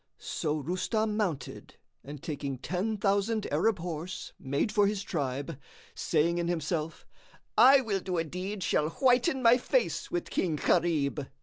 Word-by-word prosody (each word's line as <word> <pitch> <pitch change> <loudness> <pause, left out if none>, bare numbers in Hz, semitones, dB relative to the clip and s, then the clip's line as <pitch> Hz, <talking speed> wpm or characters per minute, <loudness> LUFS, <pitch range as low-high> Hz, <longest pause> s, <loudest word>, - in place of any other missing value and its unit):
So 150 0 -2
Rustam 210 - -1
mounted 190 -10 -3 0.3
and 145 0 -9
taking 140 -3 -4
ten 190 - -2
thousand 200 +2 +1
Arab 195 +8 +2
horse 170 +1 -6
made 140 - -1
for 205 -2 +4
his 205 -1 -2
tribe, 140 -4 -3 0.3
saying 170 +2 +1
in 170 - -1
himself, 165 -1 -2 0.5
"I 270 +1 +8
will 210 -6 -1
do 185 -1 -3
a 165 - +1
deed 185 +4 -5
shall 155 -2 +1
whiten 255 - +2
my 235 +1 +7
face - - 0
with 350 -1 -3
King 170 -4 0
Gharib." 150 -4 +1
180 Hz, 145 wpm, -29 LUFS, 150-210 Hz, 0.5 s, I